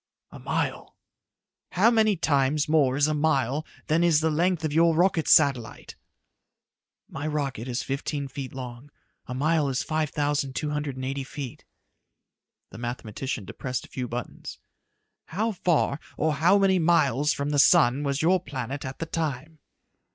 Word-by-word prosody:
"A - - -11
mile." - - -3 0.8
"How 210 +6 +4
many 215 -3 +3
times 145 -3 +1
more 145 -4 +3
is 145 - +4
a 155 - 0
mile 150 -1 0 0.2
than 160 +3 +2
is 165 -3 +4
the 160 0 +1
length 170 +1 +1
of 150 - -2
your 165 +1 +4
rocket 175 -1 +2
satellite?" 135 -7 +2 1.1
"My 145 +2 -5
rocket 140 -6 -3
is 125 0 -2
fifteen 140 +1 -3
feet 135 0 -7
long. 125 +1 -8 0.4
A 125 - -5
mile 150 +1 +1
is 130 -1 -1
five 155 -1 -1
thousand 145 -2 -1
two 150 -1 -2
hundred 150 -2 -3
and 130 0 -5
eighty 135 +1 -3
feet." 135 -2 -8 1.1
The - - -10
mathematician 120 -1 -5
depressed 130 +6 -5
a - - -18
few 125 -1 -4
buttons. 120 0 -6 0.7
"How 220 +6 -1
far, 170 -6 0 0.2
or 155 0 +1
how 165 +7 +4
many 195 -2 +3
miles 150 -3 +3
from 140 +1 -2
the 145 - +1
sun 140 -4 +5
was 140 +1 -1
your 185 +3 +4
planet 135 -4 -5
at 130 0 -6
that 165 - -6
time?" 155 -1 -3
145 Hz, 160 wpm, -26 LUFS, 135-160 Hz, 1.1 s, sun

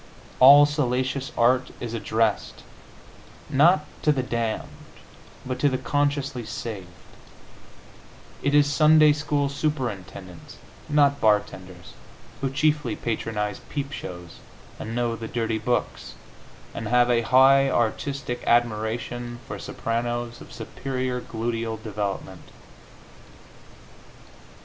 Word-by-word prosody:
All 140 +3 +9
salacious 135 -1 -1
art 125 +2 +3
is 120 -1 -5
addressed, 110 -1 -1 0.9
not 150 +3 +4 0.2
to 150 - +3
the 135 -3 0
damned, 115 -3 -2 0.8
but 130 0 -4
to 145 - +3
the 130 - -1
consciously 140 -3 -1
saved; 110 -4 -6 1.5
it 140 +1 +1
is 145 -1 +6
Sunday 155 +1 +5
school 145 -1 -1
superintendents, 120 - -5 0.3
not 145 -1 +3
bartenders, 95 -4 -1 0.5
who 135 - 0
chiefly 145 -3 0
patronize 105 -3 -3
peep 140 -1 -4
shows, 85 -9 -8 0.4
and 115 +1 -5
know 120 -1 0
the 115 0 -7
dirty 115 -2 -2
books, 115 - -2 0.6
and 115 - -5
have 125 +1 +3
a 120 -1 +3
high 135 +3 +5
artistic 125 +2 -2
admiration 120 +1 0
for - - -6
sopranos 120 +1 -3
of - - -13
superior 130 -2 -4
gluteal 115 -1 -3
development. 100 -3 -5
120 Hz, 105 wpm, -24 LUFS, 115-140 Hz, 1.5 s, All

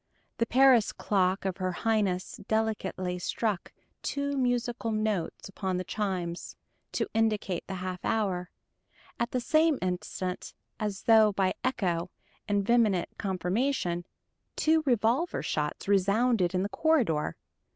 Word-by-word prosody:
The 230 - +2
Paris 255 -3 +5
clock 190 -1 0
of 190 -1 -1
her 185 -1 -1
Highness 200 -2 0
delicately 195 -5 -1
struck 200 0 -2 0.3
two 280 0 -2
musical 245 -3 0
notes 215 -5 -1
upon 190 -1 -3
the 185 - -2
chimes, 185 -4 -3 0.4
to - - 0
indicate 215 -5 0
the 190 - -4
half 185 0 -5
hour; 190 -5 0 0.7
at 235 - 0
the 250 - -1
same 310 +3 +3
instant, 180 0 -3 0.2
as 210 -3 -3
though 220 -2 +6
by 190 -1 +1
echo 180 -9 0 0.4
and 205 -1 +1
vehement 215 -6 +3
confirmation, 185 -1 -1 0.5
two 320 0 +3
revolver 245 +7 +2
shots 150 +4 -2
resounded 200 0 +3
in 185 - +1
the 200 - -2
corridor. 230 - +1
205 Hz, 125 wpm, -29 LUFS, 185-235 Hz, 0.7 s, though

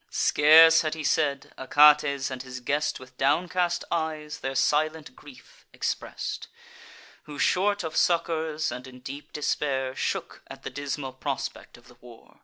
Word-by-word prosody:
Scarce 160 +2 +6
had 155 -1 -2
he 155 - -6
said; 140 -2 0
Achates 145 0 +4
and 130 -1 -5
his 130 0 -8
guest, 145 +4 -1
With 130 0 -15
downcast 175 +4 +1
eyes, 155 -2 -3
their 135 0 -4
silent 150 0 0
grief 140 -3 -17
express'd; - - -4 0.8
Who, 150 -1 -9
short 200 +4 +1
of 160 -1 -5
succours, 160 -2 0
and 125 +1 -7
in 125 -1 -13
deep 140 +3 -9
despair, 135 -3 -2
Shook - - -3
at - - -12
the - - -6
dismal 140 -2 -5
prospect 135 0 -5
of 120 - -20
the 125 - -19
war. 120 -2 -17
145 Hz, 150 wpm, -26 LUFS, 130-160 Hz, 0.8 s, Scarce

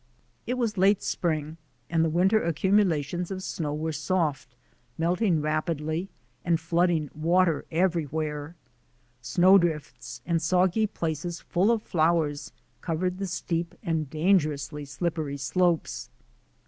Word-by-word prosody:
It 250 - 0
was 225 -5 -1
late 195 +1 +4
spring 155 -2 -2 0.3
and 165 -1 +1
the 165 - +2
winter 190 +7 +3
accumulations 175 -1 +1
of 190 -1 -5
snow 155 -5 -3
were 160 +1 -2
soft, 150 -4 -1 0.4
melting 175 0 +1
rapidly, 155 +3 -2 0.3
and 170 -2 +2
flooding 165 -2 +1
water 165 +1 +2
everywhere. 160 -3 -1 0.7
Snow 180 +11 +5
drifts 130 -8 -3
and 170 -2 0
soggy 185 +5 +2
places 165 -1 -3
full 185 +5 +1
of 230 -2 +2
flowers 155 - 0 0.3
covered 180 +2 -2
the 195 - -2
steep 170 -1 -3
and 160 -6 -1
dangerously 150 -4 +1
slip 165 +4 -3
pery 145 -3 -3
slopes. 170 +5 0
165 Hz, 120 wpm, -27 LUFS, 155-180 Hz, 0.7 s, Snow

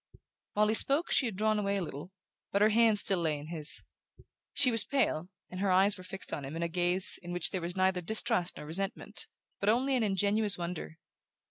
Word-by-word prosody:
While 210 +1 +2
he - - +2
spoke 280 +8 +4
she 255 - +2
had 220 - -6
drawn 215 +1 0
away 200 -1 -1
a 195 - -2
little, 155 +2 -8 0.4
but 200 +1 +2
her 215 - +5
hand 225 -1 +3
still 195 -2 +4
lay 160 -3 -1
in 145 +2 -10
his. 160 -3 0 0.7
She 275 -3 +2
was 230 -1 +4
pale, 205 - -1 0.2
and 180 - -7
her 200 0 0
eyes 190 +2 +3
were 185 - -12
fixed 190 +1 -8
on 145 - -4
him 135 +3 -7
in 165 - -3
a - - 0
gaze 180 +2 +4
in 175 -1 -9
which 175 -1 +3
there 185 - -3
was 175 +2 -5
neither 185 -1 +1
distrust 220 -1 0
or 150 - -9
resentment, 190 +6 -5 0.3
but 200 - 0
only 260 +4 +1
an 250 - 0
ingenuous 205 +1 0
wonder. 170 -2 -6
190 Hz, 220 wpm, -30 LUFS, 175-215 Hz, 0.7 s, her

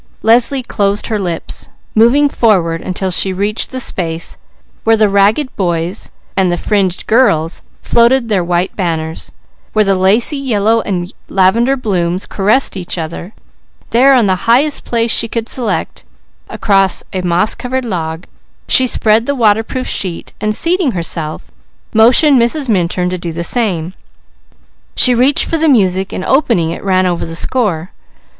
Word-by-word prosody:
Leslie 245 +4 +3
closed 200 -3 -1
her 215 -2 -2
lips, 175 -4 -5 0.2
moving 240 +7 +4
forward 180 -11 +1
until 185 +1 -3
she 190 +2 +4
reached 205 +3 -2
the 260 - -6
space 165 -8 -2 0.5
where 225 0 +3
the 215 -1 +3
ragged 205 +8 +1
boys 175 +1 -2 0.3
and 190 -2 +1
the 175 - -1
fringed 190 -2 -1
girls 165 -9 +1 0.2
floated 235 +1 +2
their 200 -5 0
white 175 +2 -2
banners, 160 -4 -4 0.4
where 215 -1 +2
lacy 200 +10 +2
yellow 225 -4 0
and 180 -3 -4 0.2
lavender 230 +8 +2
blooms 185 -6 -2
caressed 215 +7 +1
each 180 -1 -4
other, 170 +3 -6 0.6
there 265 +3 +4
on 240 -4 +3
the 190 +3 -2
highest 280 +5 +2
place 230 -1 0
she 230 - +3
could 230 0 -4
select, 245 -2 -1 0.5
across 195 -2 +1
a 185 - -2
moss 180 +3 +2
covered 260 +1 -4
log, 165 -4 -4 0.4
she 260 - +4
spread 225 -1 +2
the 285 - -1
waterproof 225 +2 0
sheet, 180 -4 -2
and 215 0 0
seating 335 - +1
herself, 165 -3 -4 0.4
motioned 245 +5 +5
Mrs. 265 +4 0
Minturn 180 -3 -1
to 185 - -4
do 170 -1 -5
the 170 +1 -5
same. 185 -6 -1 1.0
She 250 - +5
reached 255 +4 +3
for 330 - -1
the 320 0 +2
music 190 -6 +1
and 185 - -5
opening 230 - +1
it - - -7
ran 185 -1 +1
over 175 -2 -1
the 165 - -6
score. 185 -4 -1
205 Hz, 150 wpm, -13 LUFS, 180-240 Hz, 1.0 s, motioned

